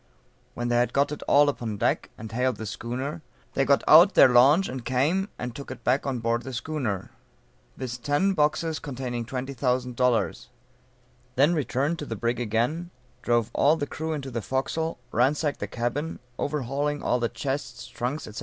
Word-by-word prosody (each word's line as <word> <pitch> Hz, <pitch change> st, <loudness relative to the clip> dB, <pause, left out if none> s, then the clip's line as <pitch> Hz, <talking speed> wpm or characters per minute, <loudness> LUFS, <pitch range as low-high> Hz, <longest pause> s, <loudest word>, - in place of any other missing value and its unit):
When 120 Hz, 0 st, -2 dB
they 120 Hz, -, +2 dB
had 120 Hz, 0 st, +1 dB
got 140 Hz, +1 st, +2 dB
it 150 Hz, -, -5 dB
all 145 Hz, +1 st, +6 dB
upon 115 Hz, -7 st, -2 dB
deck, -, -, 0 dB
and 110 Hz, +1 st, -8 dB
hailed 125 Hz, +2 st, 0 dB
the 110 Hz, -, -6 dB
schooner, 130 Hz, -, -4 dB, 0.3 s
they 135 Hz, -, +1 dB
got 140 Hz, 0 st, +3 dB
out 170 Hz, +6 st, +8 dB
their -, -, +8 dB
launch 135 Hz, +10 st, +5 dB
and 130 Hz, -1 st, -6 dB
came 150 Hz, -, +1 dB
and 125 Hz, -1 st, -5 dB
took 140 Hz, -, -8 dB
it -, -, -8 dB
on 130 Hz, +1 st, +1 dB
board 115 Hz, 0 st, 0 dB
the 130 Hz, +2 st, -7 dB
schooner, 120 Hz, -, -3 dB, 0.7 s
viz: 125 Hz, -1 st, -5 dB
ten 145 Hz, +10 st, +1 dB
boxes 155 Hz, 0 st, +1 dB
containing 125 Hz, -4 st, -4 dB
twenty 130 Hz, +3 st, -4 dB
thousand 125 Hz, -1 st, -1 dB
dollars; 120 Hz, -2 st, +1 dB, 0.9 s
then 145 Hz, +6 st, +4 dB
returned 150 Hz, +1 st, -1 dB
to 150 Hz, -, -5 dB
the 115 Hz, -, -3 dB
brig 120 Hz, +2 st, -1 dB
again, 120 Hz, +10 st, -1 dB, 0.3 s
drove 120 Hz, -1 st, +1 dB
all 150 Hz, +3 st, +4 dB
the 145 Hz, -, -2 dB
crew 160 Hz, +2 st, -4 dB
into 135 Hz, -3 st, -5 dB
the 115 Hz, -1 st, -3 dB
forecastle, 135 Hz, +7 st, -2 dB
ransacked 145 Hz, +5 st, +1 dB
the -, -, -3 dB
cabin, 125 Hz, +7 st, -3 dB, 0.2 s
overhauling 145 Hz, +1 st, -2 dB
all 125 Hz, -, +1 dB
the 115 Hz, -1 st, 0 dB
chests, 130 Hz, +1 st, -4 dB
trunks, 130 Hz, +6 st, -4 dB
&c. 110 Hz, -, -9 dB
130 Hz, 180 wpm, -26 LUFS, 120-145 Hz, 0.9 s, out